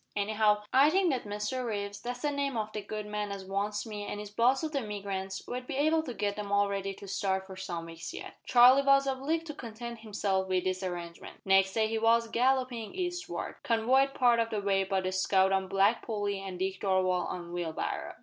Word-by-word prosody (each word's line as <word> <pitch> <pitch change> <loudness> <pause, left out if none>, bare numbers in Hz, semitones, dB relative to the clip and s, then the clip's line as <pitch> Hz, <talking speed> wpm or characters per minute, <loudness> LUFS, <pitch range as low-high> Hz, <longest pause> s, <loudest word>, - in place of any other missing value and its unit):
Anyhow, 210 0 +2
I 275 +3 +7
think 370 0 +3
that 255 -4 -2
Mr 210 +5 -3
Reeves 205 -3 -4
that's 245 0 -5
the 295 - +1
name 280 -3 -1
o' 215 -1 -1
the 210 - -3
good 210 +1 -5
man 210 -1 -3
as 195 -1 -6
wants 200 +3 -2
me 210 -2 -6
an' 205 - -4
is 210 -1 -7
boss 245 +7 +3
o' - - +1
the 300 -3 -2
emigrants 195 -4 -4
won't 250 +1 -5
be - - -4
able 310 +3 +3
to 255 -7 -7
git 205 -1 -1
them 205 -1 -5
all 200 0 +3
ready 195 0 -2
to 200 - -11
start 190 0 -1
for 190 0 -10
some 175 -3 -5
weeks 165 0 -7
yet." - - -8
Charlie 250 +2 +7
was 275 0 +4
obliged 275 +5 -1
to 305 - -6
content 235 -2 -7
himself 200 -3 -1
with 185 -1 +1
this 185 0 -1
arrangement. 175 -2 -6
Next 195 0 +4
day 220 -1 +2
he 225 0 -1
was 230 +1 +3
galloping 250 0 0
eastward 355 -1 -4
convoyed 260 +4 +2
part 240 -2 +4
of 230 0 +1
the 215 - -2
way 195 -1 +1
by 190 0 0
the 185 0 -2
scout 190 0 +3
on 190 0 +1
Black 195 +4 +2
Polly 205 -3 -2
and 190 -2 -6
Dick 190 +1 -2
Darvall 185 -2 +1
on 175 -1 -6
Wheelbarrow. 170 -2 -3
210 Hz, 220 wpm, -30 LUFS, 195-245 Hz, -, I